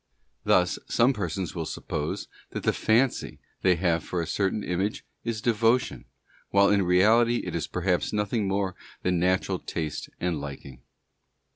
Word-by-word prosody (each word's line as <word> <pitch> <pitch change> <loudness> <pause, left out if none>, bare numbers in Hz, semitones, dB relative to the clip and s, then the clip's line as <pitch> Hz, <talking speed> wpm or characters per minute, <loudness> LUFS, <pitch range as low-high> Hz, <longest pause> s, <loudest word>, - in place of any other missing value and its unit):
Thus, 90 0 +3
some 120 +3 +3
persons 95 -4 -3
will 80 -3 -3
suppose - - -4 0.3
that - - -4
the - - +2
fancy. 120 +4 +1 0.2
they 90 -1 +4
have 85 -2 +1
for 90 - -3
a 85 - -1
certain 100 +3 -1
image 95 +4 -2 0.2
is 115 -2 -3
devotion, 115 - +2 0.4
while 100 0 +5
in 100 -1 +4
reality 110 +7 +4
it 90 - -4
is 85 - -2
perhaps 90 0 0
nothing 105 0 0
more 95 -1 -1 0.3
than 90 -1 +1
natural 95 +1 +1
taste 80 -3 -4
and 85 -4 -1
liking. 70 -3 -8
95 Hz, 150 wpm, -27 LUFS, 85-105 Hz, 0.4 s, while